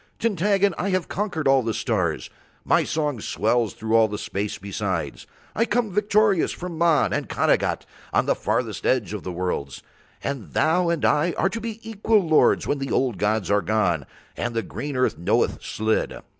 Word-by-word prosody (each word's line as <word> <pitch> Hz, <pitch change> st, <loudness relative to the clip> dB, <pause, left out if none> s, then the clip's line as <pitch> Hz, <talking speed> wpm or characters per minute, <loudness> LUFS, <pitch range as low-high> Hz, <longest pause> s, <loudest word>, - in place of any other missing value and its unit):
Tintaggon, 200 Hz, -2 st, +2 dB
I 200 Hz, -, 0 dB
have 185 Hz, -3 st, 0 dB
conquered 185 Hz, -7 st, -2 dB
all 135 Hz, -1 st, +5 dB
the 115 Hz, -2 st, -2 dB
stars, 90 Hz, -10 st, -1 dB, 0.3 s
my -, -, +3 dB
song 150 Hz, -5 st, -1 dB
swells 110 Hz, +2 st, 0 dB
through 110 Hz, +1 st, -1 dB
all 115 Hz, -1 st, +6 dB
the 105 Hz, 0 st, -5 dB
space 100 Hz, +1 st, -3 dB
besides, 100 Hz, -3 st, -4 dB, 0.3 s
I 230 Hz, -, +2 dB
come 235 Hz, -3 st, 0 dB
victorious 210 Hz, -1 st, +2 dB
from 180 Hz, -1 st, -6 dB
Mahn 165 Hz, -4 st, +3 dB
and -, -, -2 dB
Khanagat -, -, +1 dB, 0.3 s
on -, -, +2 dB
the -, -, +3 dB
furthest -, -, -2 dB
edge 110 Hz, -7 st, +1 dB
of 105 Hz, -, -4 dB
the 90 Hz, -, -5 dB
worlds, 90 Hz, -6 st, -3 dB, 0.4 s
and 140 Hz, -5 st, -4 dB
thou 170 Hz, +2 st, +2 dB
and 170 Hz, -2 st, 0 dB
I 160 Hz, +3 st, +2 dB
are 190 Hz, -, +2 dB
to 225 Hz, +4 st, -5 dB
be 225 Hz, 0 st, -6 dB
equal 215 Hz, -3 st, +1 dB
lords 155 Hz, -1 st, +4 dB
when 145 Hz, -, -1 dB
the 135 Hz, 0 st, -4 dB
old 125 Hz, -6 st, 0 dB
gods 105 Hz, -1 st, 0 dB
are 100 Hz, 0 st, +3 dB
gone 95 Hz, -10 st, 0 dB, 0.3 s
and 120 Hz, -1 st, -3 dB
the 115 Hz, -, 0 dB
green 135 Hz, +8 st, -5 dB
earth 130 Hz, -, +1 dB
knoweth 85 Hz, -, +1 dB
Slid. 110 Hz, 0 st, -1 dB
135 Hz, 185 wpm, -24 LUFS, -, 0.4 s, all